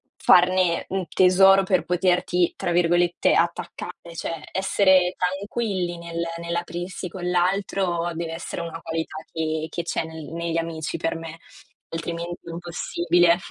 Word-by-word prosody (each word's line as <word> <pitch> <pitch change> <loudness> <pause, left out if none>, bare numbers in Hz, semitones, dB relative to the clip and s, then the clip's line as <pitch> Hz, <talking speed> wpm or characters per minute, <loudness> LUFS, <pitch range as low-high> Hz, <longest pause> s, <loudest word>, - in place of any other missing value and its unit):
farne, 180 -1 +4
mhmm, 195 0 -1
tesoro 190 +1 +6
per 190 -2 +2
poterti 180 -1 +1
tra 175 - -2
virgolette 175 0 +3
"attaccare". 170 0 -2
Cioè 165 -2 -4
essere 190 -1 +3
tranquilli 190 -1 -2
nel 170 0 -4
nell'aprirsi 175 +1 -4
con 180 0 -5
l'altro 180 -1 0
deve 165 0 -4
essere 165 +1 -5
una 165 -1 -6
qualità 160 -1 -4
che 160 -1 -2
che 170 - -4
c'è 170 - -2
nel 160 -1 -8
negli 170 0 -2
amici 165 -2 -3
per 165 0 -1
me, 165 0 -8 0.5
altrimenti 170 +1 -4
è - - -9
impossibile 175 0 +2
175 Hz, 135 wpm, -24 LUFS, 165-180 Hz, 0.5 s, tesoro